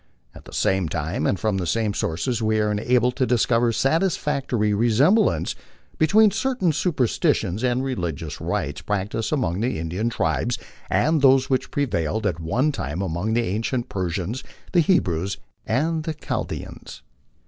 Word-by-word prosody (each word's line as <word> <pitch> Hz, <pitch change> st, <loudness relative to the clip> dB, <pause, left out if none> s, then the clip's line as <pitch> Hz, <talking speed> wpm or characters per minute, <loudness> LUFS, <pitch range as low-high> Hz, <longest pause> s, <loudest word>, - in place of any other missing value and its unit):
At -, -, -14 dB
the -, -, -12 dB
same 95 Hz, -4 st, +1 dB
time 80 Hz, +3 st, -2 dB
and 95 Hz, -, 0 dB
from 110 Hz, -3 st, 0 dB
the 90 Hz, -, -2 dB
same 110 Hz, +3 st, 0 dB
sources 115 Hz, +8 st, -1 dB
we 110 Hz, 0 st, +1 dB
are 105 Hz, 0 st, +1 dB
enabled 125 Hz, +3 st, +1 dB
to 130 Hz, -2 st, +1 dB
discover 120 Hz, -1 st, +2 dB
satisfactory 135 Hz, -, +1 dB
resemblances 120 Hz, -, +3 dB, 0.4 s
between 210 Hz, +6 st, +5 dB
certain 220 Hz, -5 st, 0 dB
superstitions 130 Hz, -, 0 dB
and 125 Hz, +1 st, +1 dB
religious 85 Hz, -, -4 dB
rites -, -, -2 dB
practised 105 Hz, +2 st, -2 dB
among 105 Hz, -, 0 dB
the 125 Hz, -4 st, 0 dB
Indian 90 Hz, +8 st, -2 dB
tribes 80 Hz, -, 0 dB, 0.3 s
and 155 Hz, -1 st, +2 dB
those 135 Hz, -1 st, +4 dB
which 130 Hz, -, +1 dB
prevailed 110 Hz, -, -1 dB
at 90 Hz, -5 st, 0 dB
one 120 Hz, -, +1 dB
time 85 Hz, -, -4 dB
among 95 Hz, +5 st, -2 dB
the 120 Hz, -, +2 dB
ancient 115 Hz, +5 st, -2 dB
Persians, 95 Hz, +5 st, -3 dB, 0.3 s
the 175 Hz, -, +4 dB
Hebrews, 100 Hz, -, +1 dB, 0.3 s
and 155 Hz, +8 st, 0 dB
the 160 Hz, 0 st, -3 dB
Chaldeans. 105 Hz, -, -6 dB
115 Hz, 150 wpm, -23 LUFS, 95-135 Hz, 0.4 s, between